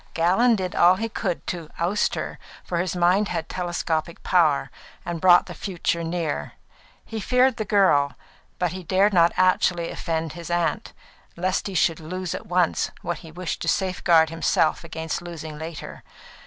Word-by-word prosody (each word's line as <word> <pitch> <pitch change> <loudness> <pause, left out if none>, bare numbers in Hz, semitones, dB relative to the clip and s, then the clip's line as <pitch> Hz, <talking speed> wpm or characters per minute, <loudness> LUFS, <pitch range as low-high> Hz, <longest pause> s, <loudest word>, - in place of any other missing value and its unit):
Gallon 190 +9 +4
did 185 -3 -3
all 180 +2 +6
he 225 +4 -2
could 190 -6 -3
to 170 -4 -5
oust 180 +5 0
her, - - -5 0.2
for 175 - -2
his 180 0 -1
mind 180 +4 +3
had 160 - -3
telescopic 170 -2 -3
power 160 -6 +2 0.3
and 170 -2 -4
brought 180 -1 +6
the - - -8
future 170 -3 -2
near. 165 -2 -3 0.5
He 225 - -5
feared 250 +3 +2
the 215 - -2
girl, 150 -10 +3 0.4
but 180 -2 0
he 185 +1 -6
dared 195 +4 +2
not 170 -2 +5
actually 180 -2 +2
offend 160 -2 -3
his 170 0 -8
aunt, 175 -1 -1 0.4
lest 185 +3 -1
he 195 - -6
should 165 -2 +2
lose 180 +3 -4
at - - -7
once 180 -2 +1
what 175 - -3
he 165 -3 -12
wished 175 0 -5
to - - -4
safeguard 175 -4 +3
himself 165 -1 +1
against 160 0 -4
losing 160 -3 -8
later. 160 0 -7
175 Hz, 170 wpm, -24 LUFS, 165-185 Hz, 0.5 s, all